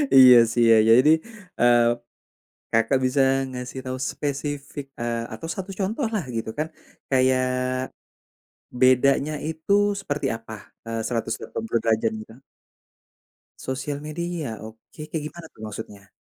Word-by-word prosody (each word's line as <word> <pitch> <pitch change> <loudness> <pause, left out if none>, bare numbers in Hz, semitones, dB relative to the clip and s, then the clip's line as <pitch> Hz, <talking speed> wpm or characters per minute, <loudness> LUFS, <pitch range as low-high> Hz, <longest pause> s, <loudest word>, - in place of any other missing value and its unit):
Iya, 130 -2 +10 0.2
sih, 120 - +3
ya - - +8
jadi, 125 +6 +6 0.5
eee, 120 0 +5 0.9
Kakak 115 +4 +3
bisa 130 +2 +1 0.3
ngasih 125 +1 -6
tahu 130 0 -3
spesifik, 145 0 -4 0.2
eee, 115 -1 -2
atau 165 - -7
1 190 -1 -6
contoh 220 +7 -1
lah 200 -6 -1
gitu 115 -1 -3
kan 155 +1 -1 0.4
kayak 130 -1 +3 1.4
bedanya 135 +3 +4
itu 160 +4 -1 0.3
seperti 145 -6 -2
apa? 115 0 -10 0.3
Eee, 115 0 -3
180 115 0 -2
derajat 110 -1 +2
juga? 110 +1 -13 1.3
Sosial 135 +2 -3
media, 170 0 -4 0.2
oke, 110 +6 -14
kayak 160 -2 -3
gimana 170 +1 -11
tuh - - -17
maksudnya? 100 -1 -9
130 Hz, 120 wpm, -24 LUFS, 115-150 Hz, 1.4 s, Iya